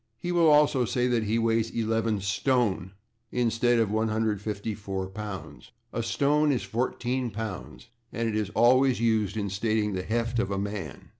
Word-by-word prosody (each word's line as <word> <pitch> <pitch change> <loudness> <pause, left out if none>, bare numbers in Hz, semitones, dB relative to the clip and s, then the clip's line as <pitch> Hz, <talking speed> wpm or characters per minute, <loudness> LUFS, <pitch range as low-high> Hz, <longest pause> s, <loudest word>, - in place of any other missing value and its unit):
He 175 +9 -4
will 170 -2 +4
also 150 -3 +5
say 125 +1 0
that 120 -3 +1
he 110 +2 +1
weighs 115 0 +1
eleven 115 -1 0
/stone/ 100 -3 0 0.4
instead 120 0 +2
of 110 -3 +1
154 105 -3 -2
pounds. 105 +3 -8 0.2
A - - -2
/stone/ 140 +6 +2
is 125 - 0
14 125 +1 -2
pounds, 110 +2 -7 0.2
and 115 0 -2
it 110 - -2
is 105 -2 -1
always 130 +1 +4
used 110 -3 +1
in 100 -2 -2
stating 105 +1 0
the 95 - -2
heft 115 +4 -1
of 105 - 0
a 100 - -2
man. 100 - -5
115 Hz, 160 wpm, -27 LUFS, 105-120 Hz, 0.4 s, also